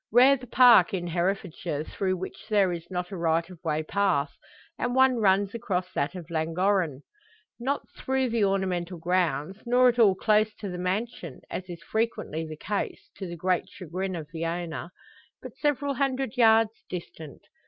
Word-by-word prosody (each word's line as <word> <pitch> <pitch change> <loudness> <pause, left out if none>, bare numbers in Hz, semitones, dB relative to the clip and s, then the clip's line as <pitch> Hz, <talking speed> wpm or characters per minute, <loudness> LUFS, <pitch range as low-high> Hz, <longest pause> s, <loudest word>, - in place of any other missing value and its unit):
Rare 255 +4 +7
the 250 -1 -10
park 235 -6 +6
in 175 -2 -3
Herefordshire 175 -3 -2
through 185 +3 -2
which 185 +4 -8
there 200 -4 +3
is 170 -1 -7
not 180 0 -4
a - - -4
right 165 -1 +1
of 175 - -14
way 155 -1 0
path, 165 -6 +1 0.5
and 245 0 -1
one 260 -1 +5
runs 200 -2 +2
across 185 -5 -3
that 140 - -1
of 170 -3 -8
Llangorren. 165 -2 0 0.6
Not 270 +4 -2
through 265 -1 0
the 230 -2 +1
ornamental 185 -3 0
grounds, 180 +1 0
nor 250 +1 +5
at 240 0 -1
all 205 -5 +6
close 215 +1 +2
to 205 - -6
the 180 -1 -5
mansion 185 - -3
as 185 0 -5
is 170 -1 -8
frequently 215 -6 -2
the 155 -1 -8
case, 205 +6 -4
to 190 - -5
the 170 0 -7
great 180 +1 0
chagrin 185 +1 -5
of 160 -3 -6
the 165 0 -4
owner 170 0 -3 0.5
but - - -10
several 285 -1 0
hundred 270 -2 -1
yards 225 -2 +5 0.2
distant. 160 -4 -8
190 Hz, 175 wpm, -27 LUFS, 170-225 Hz, 0.6 s, Rare